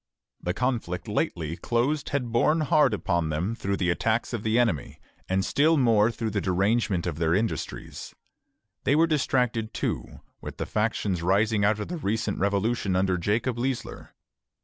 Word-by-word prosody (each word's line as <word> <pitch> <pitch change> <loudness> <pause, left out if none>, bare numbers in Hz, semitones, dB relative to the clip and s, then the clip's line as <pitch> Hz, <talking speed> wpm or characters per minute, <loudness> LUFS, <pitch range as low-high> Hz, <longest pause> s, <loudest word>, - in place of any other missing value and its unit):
The 90 +1 -2
conflict 120 -9 -2
lately 80 -1 -2
closed 125 - -1
had 125 -5 -2
borne 150 +7 +3
hard 150 -3 +4
upon 85 -5 0
them 85 +8 -1
through 100 -3 -2
the 90 -2 +1
attacks 110 +7 0
of 115 - -2
the 110 +1 +1
enemy, 110 - 0 0.3
and 95 +1 +1
still 155 +3 +3
more 115 -5 +4
through 115 -1 -3
the 100 -1 -1
derangement 100 0 +1
of 80 -3 -3
their 80 0 +2
industries. 110 +3 -4 0.7
They 145 - +3
were 160 +2 +5
distracted, 125 -7 0
too, - - -3 0.2
with - - -8
the - - -3
factions 105 -4 -1
rising 100 +4 +2
out 105 +1 +2
of 105 - -4
the 175 - -4
recent 110 -6 -2
revolution 100 0 0
under 95 0 +2
Jacob 115 +6 0
Leisler. 130 0 -4
110 Hz, 165 wpm, -26 LUFS, 95-120 Hz, 0.7 s, were